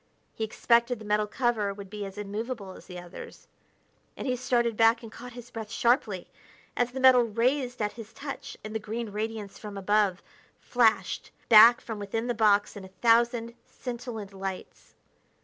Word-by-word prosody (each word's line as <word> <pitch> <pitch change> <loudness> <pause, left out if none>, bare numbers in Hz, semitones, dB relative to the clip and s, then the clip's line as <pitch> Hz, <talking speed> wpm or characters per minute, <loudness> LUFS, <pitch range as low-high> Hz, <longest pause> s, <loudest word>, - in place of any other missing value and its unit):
He 220 - -4
expected 235 +2 +2
the 215 - -11
metal 210 0 +1
cover 215 -4 0
would 200 -1 -10
be 210 -1 -5
as 195 +1 -9
immovable 210 0 -5
as - - -13
the 180 - -8
others, 175 0 -11 0.7
and - - -5
he 255 -2 0
started 240 -2 +1
back 225 +1 +4
and 225 - -9
caught 245 +2 -10
his 240 0 -11
breath 220 -2 -6
sharply 225 -5 +1 0.5
as 245 0 +1
the 265 - -5
metal 260 -1 +7
raised 245 +3 0
at 210 - -1
his 225 -2 -10
touch 280 +4 -7
and 215 0 -7
the 220 - -1
green 220 +1 -5
radiance 215 -1 -5
from 210 -2 -8
above 200 -1 +1 0.4
flashed 235 -3 +1 0.2
back 230 +2 +9
from 220 -2 -7
within 215 +3 -3
the 245 - 0
box 210 -2 +3
in 200 - -8
a - - -9 0.2
thousand 235 0 +3
scintillant 235 -5 -7
lights. 195 -1 -7
225 Hz, 175 wpm, -28 LUFS, 205-240 Hz, 0.7 s, back